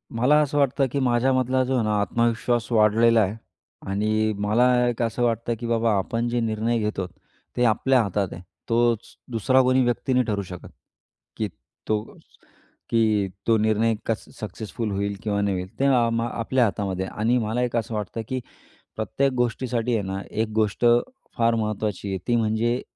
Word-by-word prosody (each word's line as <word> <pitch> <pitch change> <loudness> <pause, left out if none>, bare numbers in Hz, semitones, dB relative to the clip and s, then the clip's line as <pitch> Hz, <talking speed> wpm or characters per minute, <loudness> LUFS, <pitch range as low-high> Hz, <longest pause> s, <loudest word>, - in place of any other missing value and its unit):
मला 125 +6 +4
असं 145 0 -1
वाटतं, 135 -1 +2
की 140 - -1
माझ्यामधला 130 +1 +2
जो 130 +1 -2
आहे 120 - +1
ना 105 -1 +1
आत्मविश्वास 120 +3 0
वाढलेला 115 +1 +4
आहे 100 +2 0 0.6
आणि 110 +2 +1
मला 105 +4 +2 0.2
एक 120 0 -2
असं 115 +1 0
वाटतं, 115 0 0
की 120 - -4
बाबा 115 -1 +2
आपण 115 +5 -1
जे 120 0 0
निर्णय 115 +1 0
घेतो; 105 -4 -2 0.5
ते 125 - +2
आपल्या 125 +3 +3
हातात 100 -1 -2
आहे. 85 - -9 0.3
तोच 120 -1 +1 0.2
दुसरा 130 +3 +3
कोणी 130 0 +3
व्यक्ती 120 +2 0
नाही 125 0 +3
ठरवू 105 -2 -1
शकत, 90 -1 -9 0.7
की 110 - -1 0.4
तो 105 -1 +1 0.9
की 110 -3 +2 0.2
तो 115 - +5
निर्णय 110 +1 +2
कसा 115 -1 -3
सक्सेसफुल 110 +2 -5
होईल 100 +1 -2
किंवा 100 -2 0
नाही 100 -1 0
होईल. 90 +1 -5
ते 140 - +2
अ, 140 - +4 0.4
आपल्या 120 +2 +1
हातामध्ये 95 -3 -2
आहे 100 - -9
आणि 120 +3 +3
मला 115 +2 -1
एक 120 -1 -2
असं 115 0 -3
वाटतं, 105 +2 -4
की 130 - -1 0.6
प्रत्येक 135 +6 0
गोष्टीसाठी 120 0 0
आहे 110 - 0
ना 95 0 -3
एक 110 0 -1
गोष्ट 110 +2 +1 0.5
फार 115 0 +3
महत्त्वाची 105 -2 -2
आहे. 95 - -1
ती 120 - +2
म्हणजे 115 +2 +1
115 Hz, 170 wpm, -24 LUFS, 105-120 Hz, 0.9 s, तो